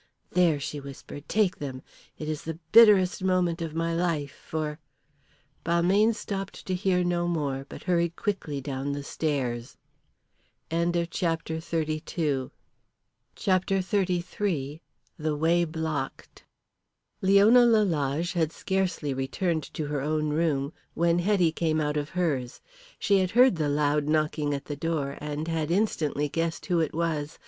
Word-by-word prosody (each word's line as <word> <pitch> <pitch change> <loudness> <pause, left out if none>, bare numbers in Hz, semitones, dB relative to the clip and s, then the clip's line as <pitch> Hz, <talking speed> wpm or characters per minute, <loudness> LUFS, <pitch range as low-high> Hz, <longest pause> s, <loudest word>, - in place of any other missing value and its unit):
"There," 170 -5 +3
she 145 +1 -4
whispered. 140 +1 -10
"Take 210 -4 +2
them. 130 -3 -6 0.3
It 155 - -6
is 155 -1 -3
the 160 -1 -5
bitterest 200 -5 +6
moment 180 -2 +1
of 160 -2 -4
my 165 0 0
life 165 -5 -1
for 155 0 -5 0.4
" 140 +2 -37
Balmayne 185 +7 +3
stopped 195 -2 -5
to 185 - -2
hear 180 -1 +1
no 175 0 0
more, 140 -5 -2
but - - -9
hurried 170 -2 +1
quickly 170 -10 -3
down 135 0 -3
the 145 0 -4
stairs. 130 -6 -2 0.9
CHAPTER 170 +1 +1
XXXIII. 160 -4 -2 0.9
THE 185 -5 0 0.6
WAY 170 +3 +2
BLOCKED. 155 -4 -5 0.8
Leona 200 +6 +6
Lalage 175 - +2
had 165 -3 +1
scarcely 180 -7 -1
returned 155 +5 -1
to 155 - -2
her 145 -1 -2
own 155 +1 0
room 150 -3 0 0.2
when 170 +1 +2
Hetty 180 -3 +3
came 160 -1 0
out 150 -1 0
of 145 0 -2
hers. 145 -9 -1 0.4
She 200 -1 +3
had 185 -1 +1
heard 245 -2 +5
the 150 -2 0
loud 145 0 +1
knocking 150 -1 +1
at 140 - -6
the 145 - -4
door, 145 -2 -2
and 150 +1 -4
had 160 -2 -1
instantly 165 -6 0
guessed 165 +1 -2
who 175 -2 +1
it 160 -2 -1
was. 160 -2 -2
160 Hz, 140 wpm, -27 LUFS, 145-180 Hz, 0.9 s, bitterest